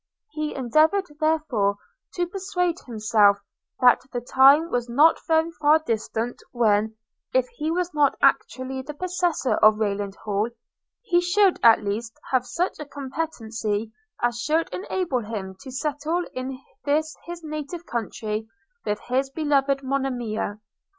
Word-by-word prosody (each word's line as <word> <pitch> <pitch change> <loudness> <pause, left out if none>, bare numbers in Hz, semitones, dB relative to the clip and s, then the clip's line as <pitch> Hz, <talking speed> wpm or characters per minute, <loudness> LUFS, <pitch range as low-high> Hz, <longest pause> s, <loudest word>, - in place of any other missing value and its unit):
He 305 -1 -3
endeavoured 310 - +3
therefore 285 -11 +1 0.4
to 355 - +1
persuade 360 -1 -2
himself, 215 -3 +3 0.4
that 250 -1 +6
the 245 - -2
time 275 +7 +5
was 245 0 -1
not 295 +7 +5
very 320 0 +2
far 305 -1 +4
distant 230 -4 -3
when, 220 -2 +2 0.4
if - - +3
he 315 -10 -4
was 355 +1 -1
not 295 -2 +3
actually 260 0 +1
the 295 +3 -8
possessor 355 -4 0
of 215 0 +6
Rayland 200 -2 -2
Hall, 210 +1 -1 0.5
he 350 -6 +3
should 380 +2 +3
at 225 -2 +6
least 220 +3 -4
have 255 -1 +2
such 355 +7 -2
a 300 - -5
competency 230 -7 -4 0.3
as 240 -1 0
should 315 +6 +1
enable 365 -8 -1
him 205 -4 -6
to 275 - -9
settle 300 +5 -2
in 255 0 -5 0.2
this 310 +2 0
his 345 -1 -7
native 305 +3 -6
country 220 - -3 0.4
with 210 0 -1
his 265 +2 -1
beloved 275 -2 +1
Monimia. 245 -6 -2
270 Hz, 135 wpm, -24 LUFS, 225-320 Hz, 0.5 s, that